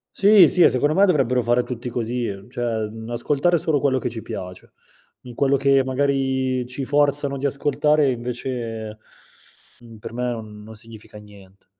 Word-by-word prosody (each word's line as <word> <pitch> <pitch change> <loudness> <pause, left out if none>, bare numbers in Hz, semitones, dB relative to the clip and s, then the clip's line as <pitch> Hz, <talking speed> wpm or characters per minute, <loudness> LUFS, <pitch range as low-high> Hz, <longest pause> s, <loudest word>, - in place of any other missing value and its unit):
Sì, 200 -3 +7
sì, 180 - +3
e - - +8
secondo 145 +4 +1
me, 195 +3 +5
dovrebbero 130 - +2
fare 120 +1 +2
tutti 125 0 -6
così, 120 0 -3 0.2
cioè, 115 -3 -2
mhmm, 110 +1 -9
ascoltare 140 +8 0
solo 155 -3 0
quello 130 -2 +1
che 125 -1 -3
ci 115 -1 -7
piace. 90 -2 -9 0.5
In 120 -2 -11
quello 140 0 +2
che, 135 0 +3
magari, 130 -1 -1
ci 130 +2 -6
forzano 145 0 +1
di 135 +1 -4
ascoltare, 145 +1 +1
invece, 120 -3 -5 0.8
mhmm, 115 -2 -14
per 110 - -9
me 125 +1 -2
on 105 -2 -9
non 110 +1 -12
significa 110 -1 -12
nient 100 -2 -17
125 Hz, 170 wpm, -22 LUFS, 115-140 Hz, 0.8 s, e